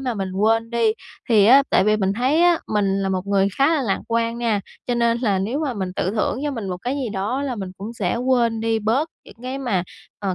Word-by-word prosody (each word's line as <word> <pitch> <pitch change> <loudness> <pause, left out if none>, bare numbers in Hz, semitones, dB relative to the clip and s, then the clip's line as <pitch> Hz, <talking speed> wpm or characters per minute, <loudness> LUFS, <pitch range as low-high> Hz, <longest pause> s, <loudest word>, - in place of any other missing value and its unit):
mà 255 -3 -2
mình 195 -3 -4
quên 225 +4 +1
đi. 230 -2 +2 0.4
Thì 215 -4 +5
á, 270 +4 +7
tại - - +4
vì 215 0 +3
mình 195 -1 0
thấy 265 +9 +2
á, 350 -1 +4
mình 195 -2 0
là 195 - -1
một 190 0 -2
người 200 -1 +2
khá 275 - +5
là 285 - 0
lạc 200 -6 0
quan 230 0 0
nha. 225 -4 0 0.3
Cho 245 - 0
nên 235 0 +2
là 205 -6 +1
nếu 220 +9 -2
mà 275 -6 -2
mình 190 -3 -4
tự 185 - 0
thưởng 220 +4 -1
cho 295 - 0
mình 225 -8 -5
một 180 - -3
cái 245 +9 -3
gì 265 -4 -2
đó 215 +7 -2
là 265 -3 -2
mình 190 -2 -5
cũng 215 +4 -6
sẽ 205 -1 -1
quên 240 -3 +1
đi 225 0 0
bớt 235 +9 0 0.2
những - - -14
cái 260 +2 -4
mà, 235 -10 0 0.4
ờ, 195 -3 -2
225 Hz, 260 wpm, -22 LUFS, 200-250 Hz, 0.4 s, á